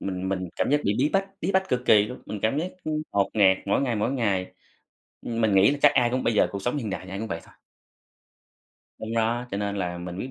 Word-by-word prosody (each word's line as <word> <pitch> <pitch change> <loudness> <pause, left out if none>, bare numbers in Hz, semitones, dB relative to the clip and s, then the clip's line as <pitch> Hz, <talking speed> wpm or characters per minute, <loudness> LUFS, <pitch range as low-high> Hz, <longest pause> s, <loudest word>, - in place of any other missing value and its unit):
mình 95 -1 -3
mình 95 -2 -2
cảm - - 0
giác 145 +1 +3
bị 100 - +2
bí 140 +4 +3
bách, 195 0 +1
bí - - -1
bách 190 0 +1
cực 125 -5 0
kỳ 105 -1 +6
luôn, 125 - -9
mình 105 - -5
cảm 110 +6 +1
giác, 175 +4 -2
ưm, 155 0 -1
ngột 100 -1 +1
ngạt 95 -3 +5
mỗi 100 - +2
ngày, 125 -4 0
mỗi 105 +5 0
ngày, 100 -8 -1 0.7
ưm, 115 0 -3
mình 110 -3 +3
nghĩ 95 +6 +6
là 145 - -2
chắc 145 -1 +6
ai 125 -3 +3
cũng 130 +1 -1
bây 115 - +1
giờ 105 - +4
cuộc 100 - -5
sống 125 +7 -1
hiện 115 -7 -3
đại 95 - -4
thì 95 - -10
ai 95 - -5
cũng 110 - -4
vậy 85 - -4
thôi. - - -20 1.5
Đúng 110 +1 -4
đó, 115 +2 0
cho 100 - -3
nên 100 0 -2
là 90 -2 -3
mình 90 0 -6
quyết 130 - -5
110 Hz, 275 wpm, -25 LUFS, 95-130 Hz, 1.5 s, kỳ